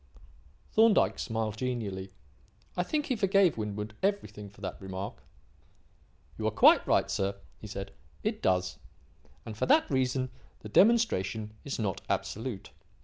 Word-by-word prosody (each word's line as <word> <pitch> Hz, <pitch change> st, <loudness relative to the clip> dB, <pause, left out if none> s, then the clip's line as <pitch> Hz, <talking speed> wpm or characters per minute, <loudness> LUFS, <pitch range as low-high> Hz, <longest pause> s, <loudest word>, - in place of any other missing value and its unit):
Thorndyke 220 Hz, -1 st, +4 dB
smiled 110 Hz, -2 st, -2 dB
genially. 110 Hz, -7 st, -3 dB, 0.7 s
I -, -, +1 dB
think 295 Hz, +11 st, -1 dB
he 255 Hz, -, 0 dB
forgave 195 Hz, -5 st, +3 dB
Winwood 105 Hz, 0 st, -4 dB
everything 195 Hz, -, -2 dB
for 100 Hz, -, -19 dB
that 95 Hz, -1 st, -5 dB
remark. 95 Hz, +1 st, -6 dB, 1.2 s
"You -, -, 0 dB
are -, -, +4 dB
quite -, -, +6 dB
right, -, -, +3 dB
sir," 100 Hz, 0 st, -1 dB, 0.2 s
he 110 Hz, -, -9 dB
said. 100 Hz, -1 st, -6 dB, 0.3 s
"It -, -, -1 dB
does. 90 Hz, 0 st, +1 dB, 0.7 s
And, 110 Hz, -, -6 dB
for -, -, -1 dB
that 305 Hz, +4 st, +5 dB
reason, 130 Hz, -1 st, 0 dB, 0.3 s
the 105 Hz, -, -8 dB
demonstration 110 Hz, -, +3 dB
is 140 Hz, -, -4 dB
not 100 Hz, -5 st, -2 dB
absolute. 110 Hz, -2 st, -3 dB
110 Hz, 140 wpm, -30 LUFS, -, 1.2 s, quite